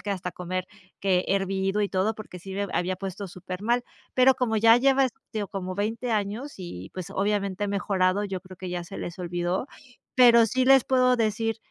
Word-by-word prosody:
que 205 - -4
hasta 180 -2 -3
comer 185 +1 -4 0.3
que 185 -2 +2
hervido 195 +1 0
y 205 - +1
todo 195 +4 0
porque 210 -4 -9
sí 190 +2 -9
me 200 +1 -2
b - - -10
había 185 +1 0
puesto 195 +1 -5
supermal, 185 +7 -2 0.3
pero 260 +1 +5
como 225 -3 0
ya 225 +2 +7
lleva, 270 +1 +4
este, 220 -3 -6
o 200 - -5
como 185 -2 -4
20 225 +4 -2
años 215 +7 -2
y, 95 - -8
pues, 185 -1 -6
obviamente 200 0 -1
he 205 - -2
mejorado, 195 0 +1
yo 190 -2 -4
creo 185 0 -13
que 185 0 -6
ya 175 -1 -4
se 195 - -8
les 175 +1 -6
olvidó, 175 +5 -2 0.5
pero 235 -2 +7
sí 255 +3 +1
les 270 -2 +7
puedo 255 -1 +3
decir 225 0 0
200 Hz, 205 wpm, -26 LUFS, 185-225 Hz, 0.5 s, ya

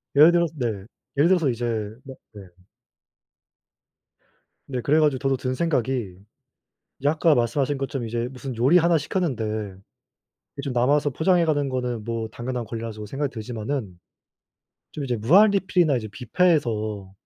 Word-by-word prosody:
예를 155 +4 +8
들어서 170 -2 +1
네. 110 -6 -3 0.3
예를 145 - +5
들어서 170 -7 +3
이제 120 0 -2 0.4
막 135 -1 -10 0.2
네. 100 -2 -10 2.2
네. 130 -2 -3
그래 150 +5 +3
가지고 145 -4 +2
저도 135 -1 +1
든 130 0 -2
생각이 130 - -1 0.9
이제 140 - +2
아까 155 0 +3
말씀하신 130 +4 0
것처럼 135 -3 -3
이제 115 +1 -2
무슨 130 -1 -7
요리 135 +10 +5
하나 170 -1 +3
시켰는데 145 - -2
이게 105 -3 -6 0.6
좀 135 -3 -3
남아서 140 +4 +2
포장해 170 +4 +2
가는 145 -3 0
거는 125 -3 -3
뭐 115 0 -3
당연한 120 +1 -4
권리라 115 +1 -5
저도 105 0 -8
생각이 135 +5 -3
들지만은 110 -3 -5 1.0
좀 145 - -5
이제 125 -3 -1
무한리필이나 180 - +4
이제 110 -2 -4
뷔페에서 110 - 0
130 Hz, 325 characters per minute, -24 LUFS, 115-150 Hz, 2.2 s, 예를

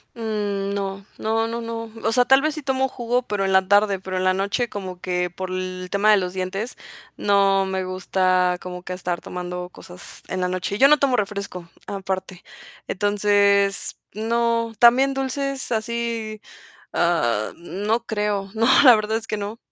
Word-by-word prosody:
Mm, 205 -3 -2
no, 195 -1 -4
no, 225 +1 0
no, 230 +1 -4
no. 230 -1 -5
O - - +1
sea, 245 +2 +3
tal 270 +1 +5
vez 310 +1 -1
sí 310 - -6
tomo 265 0 +1
jugo, 245 0 -1
pero 205 -4 -2
en 190 - 0
la 190 0 +4
tarde, 205 -1 +3
pero 185 0 -4
en 185 - -1
la 185 0 +3
noche 200 +6 -1
como 190 -4 -7
que 180 -1 -1
por 185 +1 -6
el 185 0 -4
tema 200 +2 +3
de 210 - +7
los 180 -2 -2
dientes 190 +5 -4 0.4
no 195 -1 +3
me 190 0 -2
gusta 185 -1 +1
como 180 0 -7
que 180 - -6
estar 180 -1 -3
tomando 180 0 -6
cosas 180 -1 -13
en 185 - -3
la 180 - +1
noche. 185 +2 -2
Yo 275 - +8
no 300 +1 +6
tomo 275 -3 +2
refresco 200 -5 -4 0.2
aparte. 190 -2 -5 0.4
Entonces, 200 0 +2 0.2
no 230 +1 0
también 260 +3 +6
dulces 270 0 -3
así, 225 -1 -2 0.5
ah, 120 -11 +1
no 205 +7 -2
creo. 210 -3 -2
No, 225 +1 +2 0.2
la 250 -3 +10
verdad 215 0 0
es 225 0 -5
que 215 - -3
no. 205 +2 -5
200 Hz, 175 wpm, -23 LUFS, 185-230 Hz, 0.5 s, la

